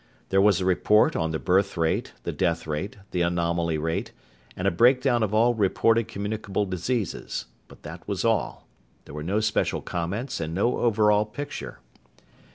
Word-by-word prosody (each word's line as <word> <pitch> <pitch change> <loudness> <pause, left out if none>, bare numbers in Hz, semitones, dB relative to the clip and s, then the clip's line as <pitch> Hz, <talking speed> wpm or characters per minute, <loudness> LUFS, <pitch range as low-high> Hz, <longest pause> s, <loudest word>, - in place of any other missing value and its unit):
There 95 0 +3
was 100 -3 +4
a 95 - -2
report 105 +3 +3
on 80 - 0
the 80 - -2
birth 95 +3 +1
rate, 80 -1 0
the - - -2
death 85 -3 -1
rate, 80 +7 -4
the 90 - -1
anomaly 85 -1 0
rate, 80 +2 -2 0.5
and 90 - -1
a - - +3
breakdown 125 +5 +3
of 110 -3 0
all 115 +3 +4
reported 115 +2 +2
communicable 105 -1 -3
diseases. 95 +3 -3 0.2
But - - -17
that - - -9
was - - -2
all. - - 0 0.4
There - - -12
were 75 - -5
no 100 +7 0
special 110 0 0
comments 100 +10 -3
and 80 0 -4
no 110 +6 +1
overall 105 -2 +3
picture. 140 +7 -7
100 Hz, 165 wpm, -25 LUFS, 85-110 Hz, 0.5 s, was